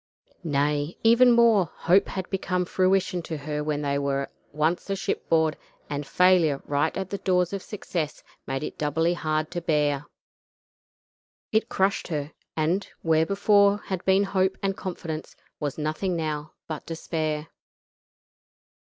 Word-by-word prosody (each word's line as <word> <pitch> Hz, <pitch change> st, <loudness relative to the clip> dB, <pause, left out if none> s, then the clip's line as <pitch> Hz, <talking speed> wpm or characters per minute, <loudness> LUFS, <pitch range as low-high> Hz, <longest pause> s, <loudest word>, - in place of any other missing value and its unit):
Nay, 145 Hz, 0 st, 0 dB
even 235 Hz, +2 st, +6 dB
more; 230 Hz, -7 st, +5 dB
hope 185 Hz, +4 st, +3 dB
had 190 Hz, -1 st, -4 dB
become 180 Hz, -2 st, 0 dB
fruition 185 Hz, 0 st, +1 dB
to 160 Hz, -1 st, -5 dB
her 150 Hz, +1 st, -3 dB
when 150 Hz, -1 st, -1 dB
they 140 Hz, 0 st, 0 dB
were 140 Hz, -1 st, -1 dB, 0.2 s
once 155 Hz, +6 st, 0 dB
a 195 Hz, -, +1 dB
shipboard, 160 Hz, -4 st, +1 dB, 0.4 s
and 145 Hz, -1 st, -3 dB
failure 180 Hz, -6 st, +4 dB
right 145 Hz, +2 st, 0 dB
at 190 Hz, -1 st, -4 dB
the 200 Hz, -, -3 dB
door 180 Hz, -1 st, +3 dB
of 190 Hz, +2 st, -4 dB
success 170 Hz, -7 st, -4 dB, 0.2 s
made 135 Hz, +2 st, -2 dB
it -, -, -6 dB
doubly 160 Hz, +3 st, +1 dB
hard 155 Hz, -2 st, -1 dB
to 175 Hz, -, -3 dB
bear. 150 Hz, -4 st, +1 dB, 1.4 s
It 220 Hz, +1 st, +1 dB
crushed 195 Hz, +1 st, +1 dB
her, 150 Hz, -3 st, -3 dB, 0.3 s
and, 170 Hz, +6 st, +1 dB, 0.2 s
where 160 Hz, -1 st, +3 dB
before 200 Hz, +1 st, +4 dB
had 190 Hz, -3 st, -5 dB
been 190 Hz, +1 st, +4 dB
hope 190 Hz, -1 st, +1 dB
and 195 Hz, -1 st, 0 dB
confidence, 165 Hz, -5 st, -5 dB, 0.2 s
was 145 Hz, -3 st, -3 dB
nothing 155 Hz, +4 st, -1 dB
now 155 Hz, -2 st, -3 dB
but 155 Hz, -2 st, -5 dB
despair. 160 Hz, -1 st, -3 dB
165 Hz, 145 wpm, -26 LUFS, 150-190 Hz, 1.4 s, even